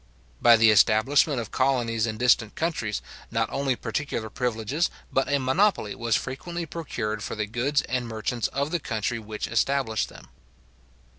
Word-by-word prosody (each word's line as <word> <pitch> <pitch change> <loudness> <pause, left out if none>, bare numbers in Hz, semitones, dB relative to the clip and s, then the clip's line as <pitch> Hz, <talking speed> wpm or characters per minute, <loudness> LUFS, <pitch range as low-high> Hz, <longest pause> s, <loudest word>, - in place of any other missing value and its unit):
By 120 -1 +8
the 110 0 +6
establishment 120 - +4
of 115 - -6
colonies 120 -4 +1
in 110 -1 -4
distant 120 -3 +3
countries, 150 -11 -2 0.3
not - - -1
only 135 -2 0
particular 115 -2 -3
privileges, 125 +7 -1 0.2
but 135 0 +1
a 140 - +4
monopoly 135 - +1
was 115 -1 0
frequently 170 +6 -4
procured 115 -10 -4
for - - -4
the 105 -1 -1
goods 125 +7 0
and 125 -1 -2
merchants 115 +1 -2
of 140 +2 -2
the 175 - 0
country 115 -3 -2
which 110 0 -5
established 135 -6 0
them. - - -14
120 Hz, 155 wpm, -26 LUFS, 110-140 Hz, 0.3 s, By